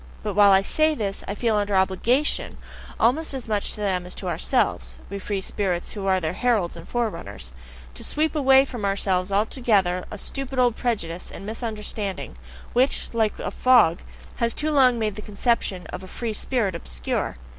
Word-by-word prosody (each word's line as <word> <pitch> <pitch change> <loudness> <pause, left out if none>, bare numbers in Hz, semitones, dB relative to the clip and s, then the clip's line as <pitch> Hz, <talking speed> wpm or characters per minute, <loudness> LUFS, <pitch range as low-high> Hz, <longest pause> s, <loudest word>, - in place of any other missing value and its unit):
But 210 -2 -2
while 205 +1 +6
I 195 0 +5
say 310 +8 +2
this, 200 -6 -3
I 200 - -3
feel 225 0 +1
under 205 -1 0
OBLIGATION 210 +10 +1 0.4
almost 275 +6 +2
as 255 -3 -6
much 210 -2 0
to 210 - -7
them 185 -3 -1
as 180 - -7
to 185 - -4
ourselves 180 - 0
(we 200 - -4
free 195 0 -3
spirits 185 -3 -2
who 200 -2 -4
are 190 -1 +3
their 160 -1 -2
heralds 215 -5 +1
and 170 0 -11
forerunners), 135 - -4 0.4
to 65 - -6
sweep 310 +1 0
away 270 -2 +6
from 245 -5 -7
ourselves 195 -1 0
altogether 200 -4 +1
a - - -7
stupid 270 +5 -4
old 245 -2 +3
prejudice 180 -8 -2
and - - -9
misunderstanding, 215 -3 -4 0.4
which, 255 +1 +1
like 220 -2 +1
a - - -4
fog, 240 -10 +5 0.4
has 235 -1 +1
too 310 +1 0
long 255 -4 +5
made 215 -2 -1
the 210 - -8
conception 205 -3 -1
of 185 +1 -7
"free 230 +1 -4
spirit" 215 -3 0
obscure. 60 - -3
210 Hz, 175 wpm, -24 LUFS, 190-245 Hz, 0.4 s, while